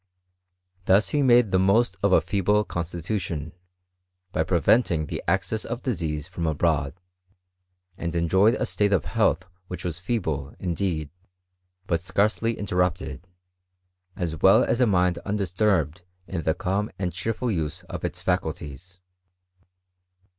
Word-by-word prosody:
Thus 100 +3 +4
he 150 - +1
made 120 -5 +5
the 95 - +3
most 100 +2 +3
of 100 - +2
a«feeble 100 +4 +3
constitution, 85 -2 -4 0.8
by - - +1
]>reyenting 85 -2 +2
the - - -4
access 95 +5 0
of 120 +2 -5
disease 80 - -2
from 85 -3 -3
abroad. 75 -2 0 1.0
And 85 0 -3
enjoyed 95 +7 +3
a - - -1
state 100 -1 +1
of 95 - +1
health - - +1 0.2
which 90 - -6
was 85 -2 -3
feeble, 80 - -2
indeed, 85 -4 -2 0.7
but 85 -3 0
scarcely 105 +5 0
interrupted; 90 -2 -1 0.9
as 85 -3 -3
well 95 - +6
as 120 - 0
a 125 - +5
mind 90 -3 +2
undisturbed 95 -4 0 0.2
in 95 -3 -4
the 80 0 0
calm 100 +4 -1
and 90 -2 -2
cheerful 115 +6 -2
use 85 -1 -3
of - - -7
its - - -4
faculties. 90 0 -3
90 Hz, 130 wpm, -25 LUFS, 85-105 Hz, 1.0 s, well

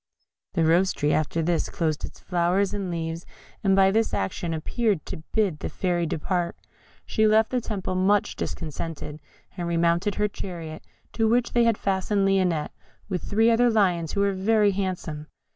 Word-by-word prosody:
The 165 -4 +2
Rose 175 +4 +3
tree 145 +1 0
after 155 +2 0
this 170 0 0
closed 155 -3 -1
its - - -7
flowers 180 +2 +1
and 200 -3 -3
leaves, 165 0 -3 0.4
and 195 -1 +4
by 195 0 +5
this 225 +2 +1
action 100 - -2
appeared 190 +3 -1
to - - -7
bid 200 -9 +1
the - - -4
Fairy 175 0 -1
depart. 170 +3 -1 0.5
She 220 0 +2
left 220 +1 +4
the 250 -1 +1
temple 200 -4 -3
much 190 +2 +2
discontented, 155 -1 -5 0.4
and 175 -2 -3
remounted 170 +4 +1
her 210 0 +1
chariot, 170 -6 -7 0.3
to 225 -1 +2
which 240 +1 +1
they 240 -1 +4
had 230 -2 +3
fastened 195 +1 0
Lionette, 185 -5 +1 0.4
with 180 -4 -2
three 225 +3 +3
other 240 +1 +4
lions 180 -7 +1
who 200 - +1
were 200 0 +2
very 205 +2 +3
handsome. 180 -6 -3
185 Hz, 170 wpm, -25 LUFS, 165-205 Hz, 0.5 s, by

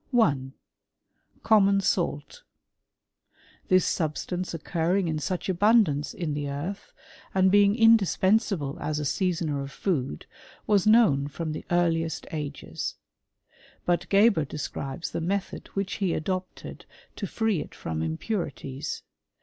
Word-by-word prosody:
1. 140 - +2 0.9
Common 200 -2 +5
salt. 170 -6 -1 1.3
This 185 -1 +4
substance 175 +3 -2
occurring 170 +3 0
in 155 -1 -1
such 180 +4 -3
Sundance 190 -6 +3
in 165 -4 -2
the 145 -1 -3
earth, 160 +9 -5 0.4
and 190 0 +4
being 205 0 +5
indispensable 205 - +3
as 150 0 -2
a - - -2
•^asoner 165 -2 -1
of 140 0 -6
food, 140 - -2 0.4
was 205 -2 +3
known 210 -12 +5
from 155 +2 -4
the 155 - -6
earliest 165 -2 +1
ages, 150 -2 -5 0.9
^ut 175 -1 +1
Geber 200 -4 +5
describes 140 +2 -5
the - - -3
method 195 +3 -3
which 195 -1 -2
he 190 -5 0
adopted 185 +3 -5 0.3
to 200 - -4
"^ee 215 -6 0
it - - -15
from 80 -1 -4
impurities. 135 - -4
175 Hz, 120 wpm, -27 LUFS, 150-200 Hz, 1.3 s, Common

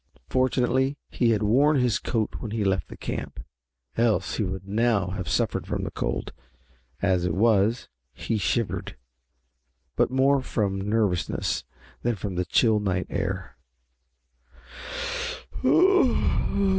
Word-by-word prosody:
Fortunately 130 +2 +1
he 120 - +2
had 110 -2 +2
worn 140 +9 +4
his 125 -3 +2
coat 110 -3 -2
when 115 - -5
he 110 0 -1
left 95 -5 0
the - - -11
camp, - - -5 0.6
else 115 -2 +1
he 110 - +1
would 95 0 -4
now 105 -2 +1
have 95 -4 -4
suffered - - 0
from - - -2
the - - -4
cold. - - -3 0.7
As 95 -3 +2
it 90 -2 0
was, 110 +2 +3 0.2
he 110 - -2
shivered, 110 - -1 1.0
but - - +3
more 135 +2 +3
from 100 -6 -1
nervousness 105 -3 0 0.4
than 120 -1 0
from 100 0 -4
the 90 0 -1
chill 110 +4 +3
night 95 -3 -1
air. - - -3
110 Hz, 125 wpm, -26 LUFS, 95-120 Hz, 1.0 s, worn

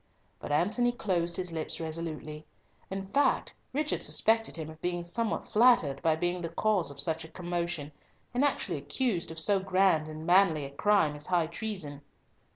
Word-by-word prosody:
But - - -6
Antony 210 +11 +2
closed 175 -8 -1
his 180 -1 -2
lips 160 -1 -3
resolutely. 155 -2 -5 0.5
In 195 0 -4
fact, 275 +9 +1 0.2
Richard 300 +2 -1
suspected 225 0 +2
him 160 -2 -5
of 155 0 -15
being 175 -1 -2
somewhat 220 +6 -2
flattered 210 - +4
by 160 -2 +3
being 175 +2 -1
the 165 - -3
cause 185 -1 +1
of 140 -1 -9
such 160 +2 +2
a - - -9
commotion, 170 -4 -3 0.4
and 250 +3 +1
actually 285 - +1
accused 235 -10 -1
of 160 - -8
so 195 +4 +3
grand 190 -4 +2
and 155 0 -7
manly 175 -4 +4
a 135 - -8
crime 160 -1 +2
as 150 0 -10
high 175 -3 +2
treason. 170 -5 -5
175 Hz, 170 wpm, -30 LUFS, 160-205 Hz, 0.5 s, flattered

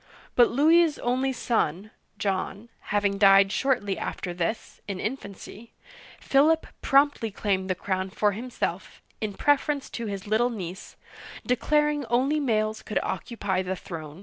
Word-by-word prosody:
But 240 -1 +6
Louis's 320 +3 +4
only 255 +2 0
son 215 - -1 0.3
(John 200 +3 -3
L) - - -19
having 205 -1 +1
died 195 -1 +6
shortly 220 -8 0
after 175 - -4
this, 175 +5 -4
in 195 -2 -4
infancy, 215 -1 -7 0.5
Philip 310 +4 +3 0.2
promptly 275 -4 +3
claimed 195 -2 -1
the 185 - +1
crown 190 0 -2
for 210 +1 +1
himself, 240 +5 -5 0.2
in 210 -2 -3
preference 290 +1 +1
to 235 -2 -4
his 200 -2 -5
little 220 +4 +2
niece, 190 -6 -7 0.5
declaring 295 +3 +1
only 260 +6 +2
males 220 -5 0
could 210 - -4
occupy 200 -5 -2
the 190 0 -3
throne. 160 -3 -8
215 Hz, 140 wpm, -26 LUFS, 195-265 Hz, 0.5 s, But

